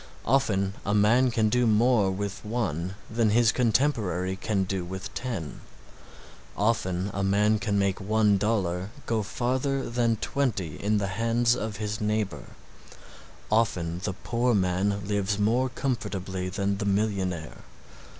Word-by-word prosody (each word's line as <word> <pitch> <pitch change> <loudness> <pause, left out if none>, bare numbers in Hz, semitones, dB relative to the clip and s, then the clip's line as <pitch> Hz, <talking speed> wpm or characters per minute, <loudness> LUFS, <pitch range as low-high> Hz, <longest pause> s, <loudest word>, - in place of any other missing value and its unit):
Often 105 -7 +2
a 105 - 0
man 115 +5 +4
can 110 -2 +1
do 125 +2 +2
more 110 -2 +4
with 100 +1 -4
one 95 -6 -2
than 110 -1 +1
his 115 +1 +4
contemporary 110 - +1
can 100 0 -1
do 95 -1 -2
with 95 +3 -7
ten, 105 - -5 1.0
often 100 -3 0
a 100 - -1
man 105 +2 +3
can 100 0 0
make 100 0 0
one 105 0 +3
dollar 95 -3 0 0.2
go 115 -2 0
farther 130 +5 -1
than 120 -1 +1
twenty 105 - -2
in 105 +1 +1
the 100 - 0
hands 115 +4 +1
of 110 -4 -4
his 105 0 -3
neighbor, 105 -1 -1 1.1
often 90 -6 +1
the 100 - -1
poor 120 +4 0
man 95 +1 0
lives 100 0 0
more 120 +5 +2
comfortably 95 -8 -3
than 100 0 -1
the 100 - -2
millionaire. 95 -5 -1
105 Hz, 140 wpm, -27 LUFS, 95-115 Hz, 1.1 s, man